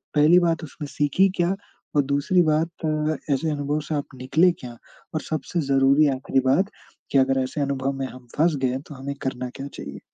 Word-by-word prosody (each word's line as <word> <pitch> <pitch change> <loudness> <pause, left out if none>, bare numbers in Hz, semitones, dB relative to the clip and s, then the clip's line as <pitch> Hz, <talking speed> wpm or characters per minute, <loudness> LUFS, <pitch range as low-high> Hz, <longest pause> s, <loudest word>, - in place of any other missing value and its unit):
पहली 155 +5 +6
बात, 165 -1 +1
उसमें 150 +1 -8
सीखी 145 +7 +2
क्या, 175 +2 +2 0.4
और 145 - +6
दूसरी 145 +6 +2
बात 155 +1 +2 0.2
अ, 155 0 0 0.2
ऐसे 160 +4 0
अनुभव 145 +1 -1
से 155 - -1
आप 145 - 0 0.2
निकले 165 +7 +4
क्या? 120 -2 -9 0.4
और - - 0
सबसे 155 +2 -3
ज़रूरी 135 +2 +5
आख़िरी 135 0 0
बात, 185 +10 +3 0.4
कि 140 - +3
अगर 135 0 +3
ऐसे 145 +3 -3
अनुभव 140 -1 0
में 130 - -1
हम 130 -1 -12
फँस 160 +1 +3
गए 130 0 +1
तो 145 - -9
हमें 140 +2 -5
करना 130 -1 -3
क्या 140 - -4
चाहिए? 70 0 -8
145 Hz, 195 wpm, -24 LUFS, 135-160 Hz, 0.4 s, पहली